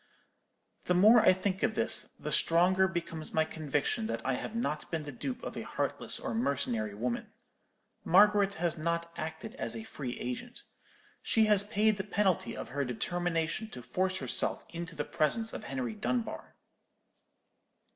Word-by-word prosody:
"The 180 - +2
more 215 +6 +7
I - - +7
think 185 +1 -1
of 220 -1 +1
this, 230 +1 +3
the 150 - -4
stronger 180 +5 +4
becomes 170 -3 -4
my 160 0 +3
conviction 145 -7 -1
that 115 +1 -4
I 135 - +1
have 215 - -4
not 155 -10 -2
been 165 -2 -2
the 145 - -6
dupe 250 - -5
of - - -5
a - - -4
heartless - - 0
or - - -3
mercenary 125 - -1
woman. 120 +3 -3 0.7
Margaret 200 +2 +5
has 170 0 +1
not 170 +1 -2
acted 160 +8 -6
as - - -3
a 225 - -5
free 135 - -6
agent. 180 - -6 0.6
She 220 -1 +3
has 210 -2 +5
paid 215 0 +2
the 190 - -2
penalty 190 - 0
of - - -6
her 140 +3 -1
determination 170 - -1
to 125 - -9
force 185 +10 -1
herself - - 0
into 170 0 -6
the - - -2
presence 220 +8 0
of 215 - -6
Henry 250 -2 -3
Dunbar. 230 +3 -3
175 Hz, 165 wpm, -31 LUFS, 150-210 Hz, 0.7 s, more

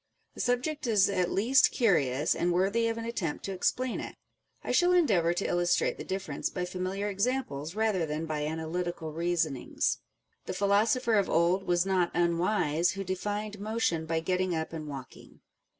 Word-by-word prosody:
The - - -5
subject 260 +4 -1
is 205 -3 +4
at 180 -2 +1
least 250 +7 +4
curious, 150 - +2
and 175 - 0
worthy 200 +6 +2
of 230 0 -2
an 230 - -4
attempt 190 -10 -3
to 195 - -3
explain 250 +6 -1
it. - - -7 0.5
I - - -3
shall 355 0 +4
endeavour 205 - +3
to 195 - -1
illustrate 175 0 +1
the - - -4
difference 190 0 -3
by 180 -1 -3
familiar 185 +3 -3
examples 200 - -2
rather 210 -6 +1
than 155 +2 -3
by 155 -1 -3
analy 160 +3 -2
tical 170 -3 -5
reasonings. 165 -5 0 0.5
The - - -3
philosopher 215 +4 +3
of 195 - -1
old 175 +3 +2
was 175 0 +2
not 185 -3 +2
unwise 170 -1 +1
who 195 0 -4
defined 205 +3 -3
motion 205 -7 -1
by 165 0 0
getting 185 +1 0
up 160 +1 -3
and 155 -2 -5
walking. 135 -3 -10
185 Hz, 170 wpm, -29 LUFS, 165-215 Hz, 0.5 s, is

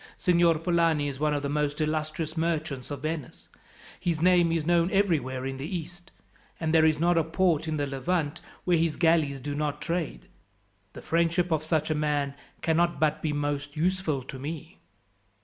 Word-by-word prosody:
Signor 170 -2 +3
Polani 165 -3 +2
is 135 -1 -7
one 150 0 +1
of 145 - -2
the - - 0
most 150 +1 -1
illustrious 155 +1 -2
merchants 160 -5 -2
of 145 -1 -6
Venice. 155 -4 -5 0.5
His 170 -3 -1
name 175 -1 +4
is 165 -2 0
known 170 +1 +3
everywhere 150 -11 +1
in 135 0 -3
the 135 +3 -5
East, 175 +3 -10 0.5
and 160 -1 -1
there 160 -1 +6
is 155 -1 +2
not 170 +1 +3
a - - +2
port 160 -1 +1
in 155 -1 -1
the 145 - 0
Levant 145 +4 -2 0.2
where 175 -2 +3
his 165 -1 +1
galleys 160 -5 +2
do 145 +2 -4
not 150 0 -2
trade. 165 - -3 0.7
The - - -10
friendship 170 +1 +1
of 155 -1 +1
such 155 -1 0
a - - +3
man 150 -2 0 0.3
cannot 170 +1 +2
but 155 -1 +1
be 155 - -1
most 145 0 -3
useful 165 -5 0
to 130 +1 -8
me. 160 +3 -7
155 Hz, 185 wpm, -27 LUFS, 145-170 Hz, 0.7 s, there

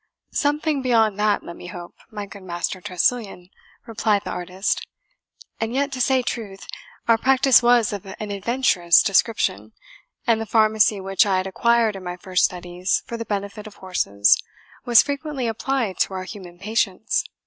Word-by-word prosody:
"Something 295 0 0
beyond 225 -5 +2
that, 210 -1 +1
let 170 - -9
me - - -10
hope, 175 -1 -9 0.2
my 210 -2 -6
good 200 0 -12
Master 175 0 -4
Tressilian," 195 -1 -1 0.3
replied 215 -3 0
the - - -5
artist; 180 +2 -3 0.7
"and 225 +2 -2
yet 280 +1 0
to 260 -2 -3
say 260 0 +2
truth, 205 -5 -5 0.4
our 230 -1 +4
practice 265 0 +5
was 240 -2 +3
of 200 -1 -6
an 205 +2 -7
adventurous 200 -5 +3
description, 215 +3 +1 0.5
and 225 -2 +2
the 225 - -5
pharmacy 215 -1 +3
which 195 +1 +2
I 190 -2 +2
had 185 - -1
acquired 230 +2 +2
in 190 - -8
my 180 0 -5
first 185 -1 +1
studies 180 +1 -2
for 235 - -6
the 230 0 -5
benefit 205 +1 -4
of 210 - -13
horses 100 - +2 0.4
was 240 -3 +7
frequently 285 -2 -4
applied 230 -2 -2
to 190 - +1
our 185 - -4
human 180 -2 -10
patients. 205 0 -1
210 Hz, 165 wpm, -22 LUFS, 185-235 Hz, 0.7 s, was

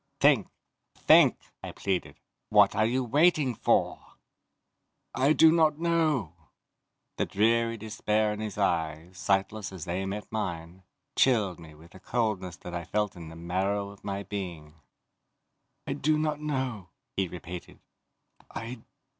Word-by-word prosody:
"Think! - - +4 0.5
Think!" - - +6 0.2
I - - -7
pleaded. 95 -3 -2 0.3
"What - - +5
are 110 +1 +3
you 130 +3 0
waiting 145 +1 +3
for?" - - 0 1.0
"I 135 +4 +3
do 160 0 +7
not 160 -3 +3
know!" 160 - +1 0.8
The - - 0
dreary 115 +2 +2
despair 110 0 0
in 105 - -7
his 110 -2 -5
eyes, 85 -2 -1
sightless 100 +1 0
as 95 -3 -7
they 90 +2 -2
met 105 +2 -4
mine, 90 -4 -4 0.3
chilled 105 -9 +2
me 80 -2 -13
with 80 +3 -17
a 95 - -13
coldness 105 -6 -2
that 90 - -9
I 85 0 -3
felt 105 +3 -1
in 85 -2 -9
the 80 - -11
marrow 95 +4 -1
of 100 - -17
my 100 0 -3
being. 85 -7 -6 1.1
"I 140 - -2
do 150 +2 +1
not 155 -1 -1
know," 130 -10 -3 0.3
he 95 -1 0
repeated. 90 0 -9 0.7
"I 115 +2 -6
105 Hz, 140 wpm, -28 LUFS, 90-125 Hz, 1.1 s, do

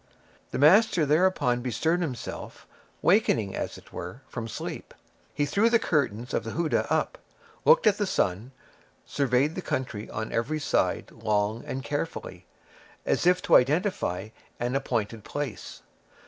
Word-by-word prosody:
The - - -4
master 175 +3 +5
thereupon 150 -6 +2
bestirred 160 +8 0
himself, 135 -9 -6 0.4
waking, 120 - +3
as - - -4
it - - -17
were, - - -7
from 115 -1 -5
sleep. - - -7 0.4
He 145 - 0
threw 200 +11 +3
the 235 - +5
curtains 130 - -1
of - - 0
the 115 - -5
houdah 165 -1 0
up, - - 0 0.5
looked 485 +1 +6
at 205 - +4
the 205 - +1
sun, 100 - -1 0.5
surveyed 140 +2 +1
the 185 - -4
country 120 -9 -3
on 110 +1 -4
every 135 +7 -1
side 145 - 0
long 105 0 -1
and 130 0 -4
carefully, 145 +3 -5 0.6
as - - +1
if 180 0 +4
to - - +4
identify 130 - 0 0.3
an 120 +2 -1
appointed 115 -5 -2
place. 140 -6 -6
140 Hz, 145 wpm, -27 LUFS, 115-170 Hz, 0.6 s, looked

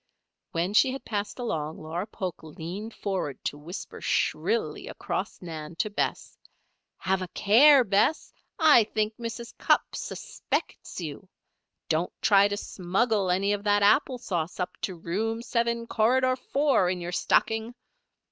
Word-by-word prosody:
When 175 +4 -1
she 255 +5 +5
had 270 - -7
passed 205 -2 -3
along 160 - -3
Laura 165 +5 -4
Polk 185 -5 -5
leaned 170 +8 -7
forward 185 -9 -3
to - - -1
whisper 170 +6 -8
shrilly 450 0 0
across - - -4
Nan 160 -1 -7
to 210 +5 -1
Bess: - - -3 0.6
"Have 190 0 0
a 185 - -3
care, 255 +10 +6
Bess! 205 +9 +1 0.2
I 300 -9 +6
think 215 0 -1
Mrs. 235 0 -6
Cupp - - +2
suspects - - -4
you. - - -7 0.6
Don't - - 0
try 200 -1 +5
to 205 0 -3
smuggle 195 +2 0
any 195 +3 +2
of 205 0 -3
that 205 0 +3
apple 255 +5 +4
sauce 175 -8 -3
up 180 - -3
to 185 - -3
Room 220 +8 -2
Seven, 235 -1 0
Corridor 255 +3 +2
Four, 270 -7 +1
in 180 0 -2
your 175 0 -5
stocking!" 220 +5 +1
205 Hz, 145 wpm, -27 LUFS, 180-235 Hz, 0.6 s, care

